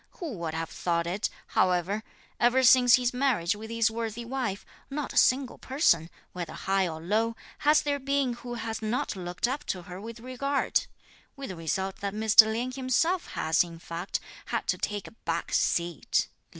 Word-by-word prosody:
Who 335 -5 -6
would 160 -2 -3
have 165 0 -3
thought 170 -1 -1
it, 185 +5 -1 0.2
however, 185 +4 +1 0.4
ever 245 +2 +4
since 245 -1 +7
his 250 -1 0
marriage 250 -10 +1
with 220 +1 -9
his 230 0 +2
worthy 230 +1 -4
wife, 240 -6 -3 0.2
not 285 0 -4
a - - -12
single 260 0 +3
person, 175 - +2 0.2
whether 175 -2 -5
high 195 -1 +1
or 160 -2 -5
low, 220 +7 0 0.2
has 300 +1 +4
there 285 -1 0
been 275 -2 0
who 240 0 -7
has 225 -1 -4
not 220 0 -1
looked 180 +3 -2
up 280 +4 -3
to 180 -2 -3
her 180 +2 -9
with 230 +2 -8
regard: 255 +3 0 0.5
with 275 -1 -7
the 185 - -5
result 190 +4 -2
that 200 0 -4
Mr. 220 0 +7
Lien 240 +3 -2
himself 270 +8 +1
has, 160 +2 +2
in 170 -1 -10
fact, 170 +2 -4 0.3
had - - -2
to - - +2
take 205 -1 -2
a - - -11
back 170 -6 -4
seat 170 -2 +1
(lit. - - -22
220 Hz, 185 wpm, -28 LUFS, 180-255 Hz, 0.5 s, since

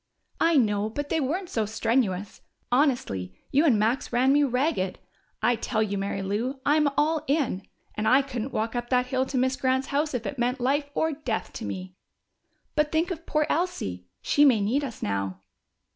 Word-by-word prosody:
"I 330 -1 +4
know, 210 -4 +2
but 290 +6 -4
they 325 - +1
weren't 345 +8 -1
so 220 -3 0
strenuous. 220 -3 -1 0.3
Honestly, 240 - +1 0.2
you 290 +4 +4
and 255 -9 +5
Max 225 +5 0
ran 255 +3 +4
me 290 - +4
ragged. 255 - 0 0.5
I 245 - +4
tell 220 -1 0
you, 205 -2 -2
Mary 195 0 -2
Lou, 230 +8 -2
I'm 300 0 +4
all 310 +1 +2
in. 275 -10 0 0.3
And 215 +1 -2
I 265 +4 +5
couldn't 260 -1 -4
walk 225 +2 -2
up 240 0 -3
that 250 -1 +3
hill 260 +1 0
to 265 - -2
Miss 260 +1 +2
Grant's 260 0 0
house 290 0 0
if 235 - -3
it 275 - -4
meant 250 +2 0
life 285 +3 +1
or 320 - +1
death 270 -7 -3
to 230 - -6
me." 185 0 -5 0.8
"But 300 -1 +2
think 330 +3 +1
of 335 -1 -6
poor 305 0 +2
Elsie! 95 - -2 0.2
She 290 - +4
may 260 -7 +6
need 235 +9 +1
us 245 -5 -6
now." 95 -2 -2
255 Hz, 190 wpm, -26 LUFS, 215-290 Hz, 0.8 s, may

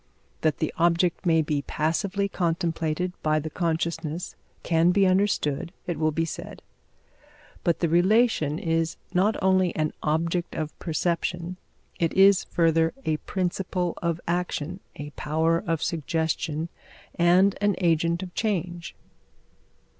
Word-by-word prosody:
That 155 -2 +1
the 155 - -2
object 170 +2 +2
may 160 -1 +4
be 150 -2 -1
passively 185 +8 -1
contemplated 170 -1 -1
by 155 0 +2
the 155 +1 -3
consciousness 165 0 -2 0.3
can 165 +1 +3
be 195 +2 +4
understood, 185 -6 +1
it 175 -3 -3
will 155 0 +3
be 165 +2 0
said; - - -7 1.0
but 170 -2 +1
the 170 - +3
relation 175 -2 +3
is 165 -1 -1 0.2
not 195 +4 +3
only 185 -2 +3
an 155 -1 0
object 165 +3 -1
of 155 -1 -3
perception 175 +1 -2 0.4
it 165 -1 +1
is, 195 0 +5
further, 165 0 +2
a 155 -1 +1
principle 180 0 -2
of 170 -1 -1
action, 175 0 -2 0.2
a 145 0 -7
power 160 +3 +1
of 165 -2 0
suggestion, 160 0 -1 0.4
and 180 +3 +4
an 205 -2 +2
agent 170 0 +1
of 180 -1 -8
change. 175 -5 -2
170 Hz, 130 wpm, -26 LUFS, 160-180 Hz, 1.0 s, is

